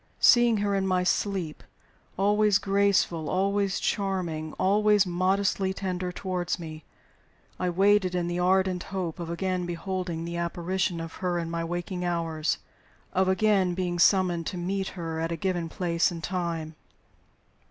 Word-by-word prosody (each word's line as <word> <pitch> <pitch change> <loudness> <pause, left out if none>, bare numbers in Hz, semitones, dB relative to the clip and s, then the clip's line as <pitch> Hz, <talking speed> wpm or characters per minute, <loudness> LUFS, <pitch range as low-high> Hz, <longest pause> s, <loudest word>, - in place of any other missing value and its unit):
Seeing 240 -2 +6
her 205 0 0
in 195 -1 +1
my 185 -1 +2
sleep, 190 -3 -1 0.5
always 205 +1 +4
graceful, 195 -5 +1
always 195 +1 +1
charming, 175 -6 -2
always 210 +1 +3
modestly 190 +1 +1
tender 185 -2 -3
toward 180 -1 -2
me, 155 -3 -8 0.8
I 180 - 0
waited 190 0 +3
in 175 -1 0
the 175 +1 -2
ardent 185 0 +2
hope 185 -3 -4
of 170 -1 -5
again 180 +1 -2
beholding 175 -1 -3
the 170 0 -4
apparition 175 +1 -1
of 165 0 -6
her 180 -1 0
in 165 -1 -3
my 170 0 -2
waking 175 +2 -4
hours 165 -3 -1 0.6
of 190 0 +2
again 190 -2 +2
being 175 -1 -2
summoned 175 -2 +3
to 180 - -4
meet 190 +2 -2
her 165 -2 -4
at 165 +1 -2
a - - 0
given 175 0 -2
place 170 -1 +1
and 170 -1 -7
time. 165 -2 -3
180 Hz, 150 wpm, -27 LUFS, 170-195 Hz, 0.8 s, Seeing